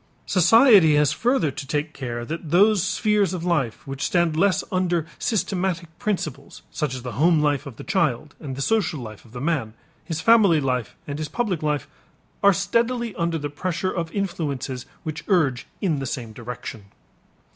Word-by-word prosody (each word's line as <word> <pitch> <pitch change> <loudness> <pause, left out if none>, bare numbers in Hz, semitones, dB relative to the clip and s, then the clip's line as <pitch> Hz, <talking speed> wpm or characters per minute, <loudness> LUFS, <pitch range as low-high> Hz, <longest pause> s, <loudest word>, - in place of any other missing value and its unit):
Society 190 - +6
has 150 -1 +3
further 235 - +1
to 135 +1 -7
take 150 +1 -2
care 120 -3 -5
that 165 +3 -5
those 200 +4 +5
spheres 200 0 +1
of 170 - -5
life 150 -10 -1
which 135 0 -6
stand 170 -3 +2
less 190 +3 +2
under 175 -3 +1
systematic 180 -6 -1
principles, 155 -9 -4
such 145 -4 -2
as 125 - -7
the 125 - -5
home 165 -1 +5
life 145 -1 +1
of 135 - -9
the - - -9
child 155 - 0
and 135 -4 -6
the 135 - -2
social 180 -4 +1
life 110 -4 -9
of 115 - -18
the 125 - -7
man, 135 -7 -1 0.3
his 165 -3 -4
family 200 -3 +5
life 125 -5 -2
and 145 +1 -5
his 155 -1 -3
public 210 -9 -1
life, 150 -3 -1 0.5
are 200 - +7
steadily 230 +4 0
under 170 -2 -1
the 145 -2 -3
pressure 180 +5 -2
of 165 -2 -3
influences 145 -10 -3 0.2
which 155 -2 -5
urge 150 - +1
in 165 -8 +1
the 135 - -3
same 120 -4 -5
direction. 120 -2 -7
160 Hz, 180 wpm, -23 LUFS, 135-185 Hz, 0.5 s, are